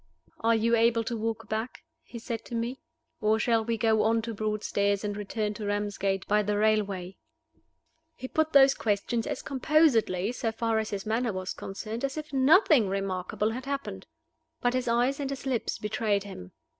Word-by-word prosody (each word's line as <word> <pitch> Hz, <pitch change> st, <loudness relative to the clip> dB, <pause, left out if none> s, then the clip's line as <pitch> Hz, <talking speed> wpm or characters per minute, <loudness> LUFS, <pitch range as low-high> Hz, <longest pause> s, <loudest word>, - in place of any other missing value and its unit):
"Are 230 Hz, 0 st, +3 dB
you 230 Hz, +1 st, +2 dB
able 230 Hz, 0 st, +3 dB
to 235 Hz, +1 st, -3 dB
walk 225 Hz, 0 st, -3 dB
back?" 220 Hz, +3 st, -4 dB, 0.2 s
he 240 Hz, -, -10 dB
said 230 Hz, 0 st, -5 dB
to 240 Hz, -, -6 dB
me. 235 Hz, +3 st, -3 dB, 0.4 s
"Or 215 Hz, +1 st, +3 dB
shall 225 Hz, 0 st, +2 dB
we 230 Hz, +1 st, -1 dB
go 220 Hz, -1 st, +3 dB
on 225 Hz, +1 st, +2 dB
to 230 Hz, 0 st, -4 dB
Broadstairs, 205 Hz, -1 st, -1 dB
and 205 Hz, -1 st, -2 dB
return 210 Hz, +1 st, -3 dB
to 210 Hz, 0 st, -6 dB
Ramsgate 200 Hz, -2 st, -1 dB
by 210 Hz, +1 st, +3 dB
the 205 Hz, 0 st, -1 dB
railway?" 200 Hz, -4 st, 0 dB, 1.0 s
He 255 Hz, -, -7 dB
put 315 Hz, +3 st, 0 dB
those 275 Hz, -1 st, +7 dB
questions 220 Hz, +2 st, -1 dB
as -, -, -4 dB
composedly, 255 Hz, -, +2 dB
so 230 Hz, -2 st, -2 dB
far 225 Hz, -1 st, 0 dB
as 220 Hz, -, -3 dB
his 200 Hz, 0 st, -4 dB
manner 225 Hz, +2 st, 0 dB
was 185 Hz, 0 st, -4 dB
concerned, 215 Hz, +5 st, -6 dB
as 275 Hz, +2 st, -2 dB
if 305 Hz, -1 st, -6 dB
nothing 275 Hz, -, +5 dB
remarkable 195 Hz, +2 st, -2 dB
had 255 Hz, +3 st, -6 dB
happened. 215 Hz, -9 st, -5 dB, 0.5 s
But 245 Hz, 0 st, +1 dB
his 255 Hz, -1 st, -1 dB
eyes 245 Hz, +4 st, +1 dB
and 275 Hz, -2 st, -2 dB
his 275 Hz, 0 st, -6 dB
lips 255 Hz, -4 st, -1 dB
betrayed 210 Hz, -1 st, -1 dB
him. 90 Hz, -, -10 dB
225 Hz, 180 wpm, -28 LUFS, 205-245 Hz, 1.0 s, those